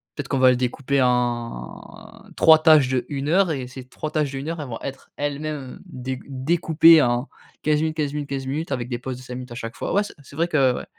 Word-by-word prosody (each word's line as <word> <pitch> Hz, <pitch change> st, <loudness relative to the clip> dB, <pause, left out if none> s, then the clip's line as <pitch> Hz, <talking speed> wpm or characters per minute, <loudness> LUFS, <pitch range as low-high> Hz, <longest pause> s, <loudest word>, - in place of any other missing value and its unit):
peut-être 145 Hz, -, -5 dB
qu'on 135 Hz, -, 0 dB
va 130 Hz, 0 st, +6 dB
le 125 Hz, -, +1 dB
découper 135 Hz, +2 st, 0 dB
en 120 Hz, -, -3 dB
3 160 Hz, -1 st, +7 dB
tâches 155 Hz, -5 st, +6 dB
d'1 135 Hz, +2 st, -2 dB
heure, 185 Hz, +1 st, +3 dB
et 130 Hz, -4 st, -3 dB
ces 125 Hz, 0 st, -10 dB
3 155 Hz, +4 st, -6 dB
tâches 150 Hz, -3 st, 0 dB
d'1 140 Hz, +3 st, -5 dB
heure, 165 Hz, -2 st, -4 dB
elles 145 Hz, -, -6 dB
vont 115 Hz, -2 st, -6 dB
être 135 Hz, 0 st, -8 dB
elles-mêmes, 145 Hz, +1 st, -3 dB, 0.2 s
heu, -, -, -15 dB
déc 130 Hz, -6 st, -6 dB
découpées 160 Hz, +3 st, +4 dB
en 120 Hz, +1 st, 0 dB, 0.3 s
15 150 Hz, 0 st, +2 dB
minutes, 160 Hz, 0 st, -2 dB
15 145 Hz, -2 st, -1 dB
minutes, 150 Hz, -1 st, -4 dB
15 135 Hz, -1 st, -4 dB
minutes 155 Hz, +7 st, -3 dB
avec 125 Hz, -2 st, -3 dB
des 120 Hz, -2 st, -3 dB
pauses 130 Hz, -1 st, -5 dB
de -, -, -12 dB
5 125 Hz, -1 st, -8 dB
minutes 125 Hz, 0 st, -8 dB
à -, -, -7 dB
chaque 115 Hz, -2 st, -6 dB
fois. -, -, -4 dB
Ouais, 205 Hz, -, +3 dB
c'est -, -, -9 dB
c'est 140 Hz, -, -15 dB
vrai 165 Hz, +3 st, +1 dB
que 135 Hz, -6 st, +2 dB
ouais. -, -, -6 dB
135 Hz, 245 wpm, -23 LUFS, 125-155 Hz, 0.3 s, 3